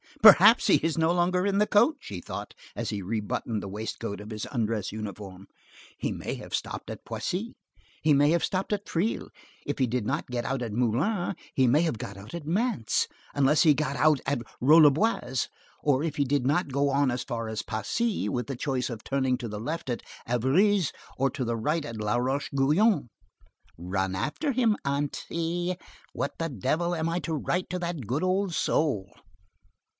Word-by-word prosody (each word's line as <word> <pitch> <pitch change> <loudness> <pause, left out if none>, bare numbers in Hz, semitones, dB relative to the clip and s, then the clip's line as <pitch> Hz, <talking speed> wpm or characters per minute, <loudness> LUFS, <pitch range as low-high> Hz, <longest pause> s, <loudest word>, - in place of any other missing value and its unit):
"Perhaps - - +9
he - - +6
is 165 0 -1
no 160 +1 +3
longer 180 +1 +2
in 200 0 +1
the 210 - +5
coach," 255 +8 +3
he 90 -3 -6
thought, - - -6 0.2
as - - -3
he 105 - -3
rebuttoned 105 +2 -2
the - - -6
waistcoat 105 +1 -5
of 105 - -9
his 110 -1 -4
undress 110 -5 -1
uniform. 100 -2 -7 0.5
"He - - -2
may - - -4
have - - -10
stopped - - -5
at - - -8
Poissy; 205 +6 -3 0.5
he 155 -1 +4
may 145 +1 +5
have 170 0 +2
stopped 190 +2 -1
at 205 0 -2
Triel; 190 +8 -1 0.4
if - - -2
he 130 - +3
did 120 -2 -1
not 135 +7 -1
get 120 -1 -2
out 135 +1 -2
at 115 -3 -3
Meulan, 145 - 0 0.2
he 130 - +3
may 140 +6 +4
have 160 -9 0
got 100 0 -6
out 100 +8 -11
at 170 -3 -5
Mantes, 195 - 0 0.3
unless 140 +2 +4
he 155 -3 +6
got 145 0 -1
out 150 +2 +4
at 135 -3 0 0.2
Rolleboise, 145 - +4 0.4
or 145 -1 +2
if 160 -3 -3
he 140 - +2
did 140 -1 +1
not 145 +2 +1
go 140 +1 +2
on 140 0 +2
as 125 0 -2
far 115 -3 -4
as 110 -1 -3
Pacy, 200 - -1
with 125 -1 -2
the 135 - -3
choice 130 0 -1
of 115 -3 -7
turning 130 -2 0
to 120 -2 -5
the 105 -1 -5
left 150 +5 -4
at 120 - -2 0.2
Évreus, 155 - +3 0.3
or 135 +1 +2
to 130 - -3
the 115 0 -1
right 150 +7 0
at 115 - -6
Laroche 125 +6 0
Guyon. 150 - +3 0.7
Run 95 +2 -2
after 210 - -1
him, 235 -4 +2
aunty. 165 +5 -2 0.4
What - - -3
the 165 0 -2
devil 160 - 0
am 160 0 -1
I 170 +1 0
to 165 - -4
write 175 +4 -1
to 180 - -2
that 170 -7 -4
good 135 +7 -1
old 185 0 +1
soul?" 130 - 0
140 Hz, 190 wpm, -27 LUFS, 115-170 Hz, 0.7 s, Perhaps